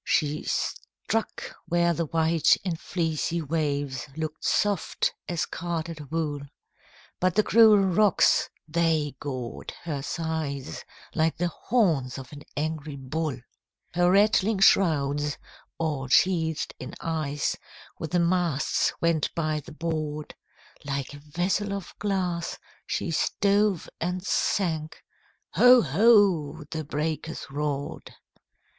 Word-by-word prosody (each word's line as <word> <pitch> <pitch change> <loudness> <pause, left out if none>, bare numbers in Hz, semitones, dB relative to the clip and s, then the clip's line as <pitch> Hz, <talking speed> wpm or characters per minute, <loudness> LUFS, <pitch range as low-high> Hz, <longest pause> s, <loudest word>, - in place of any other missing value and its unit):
She 150 0 0
struck 225 0 -3
where 170 0 +2
the 165 0 -2
white 165 0 +3
and 170 -4 -2
fleecy 165 -1 -1
waves 145 -4 -2
Look'd 155 -1 -4
soft 205 -4 +1
as 175 -2 -1
carded 165 -3 -5
wool, 155 -2 -1 0.8
But 185 -1 +1
the 215 - +4
cruel 220 -1 +7
rocks, 195 0 +3 0.2
they 160 -3 +1
gored 130 -4 -5
her 150 -5 -3
sides 155 -3 -3 0.3
Like 160 0 +1
the 175 +1 0
horns 160 - +1
of 135 +1 -9
an 145 - -9 0.2
angry 155 -1 -3
bull. 140 +2 -3 0.6
Her 175 0 +3
rattling 205 +2 +4
shrouds, 145 -7 +3 0.4
all 150 -5 -2
sheathed 160 +2 +2
in 130 - -7
ice, 155 -3 -1 0.4
With 160 - -4
the 175 - +1
masts 170 -4 +1
went 170 -3 +1
by 155 -2 0
the 150 - -12
board; 155 -2 -3 0.5
Like 140 -1 -3
a 145 - -10
vessel 180 +7 -1
of 200 -2 -6
glass, 180 -4 -1 0.3
she 170 - -2
stove 200 +2 +1
and 180 +2 -2
sank, 160 -8 0 0.5
Ho! 250 -1 +7
ho! 170 - +4
the 160 -1 -3
breakers 155 +2 -3
roared! 145 -1 -4
160 Hz, 115 wpm, -26 LUFS, 150-180 Hz, 0.8 s, cruel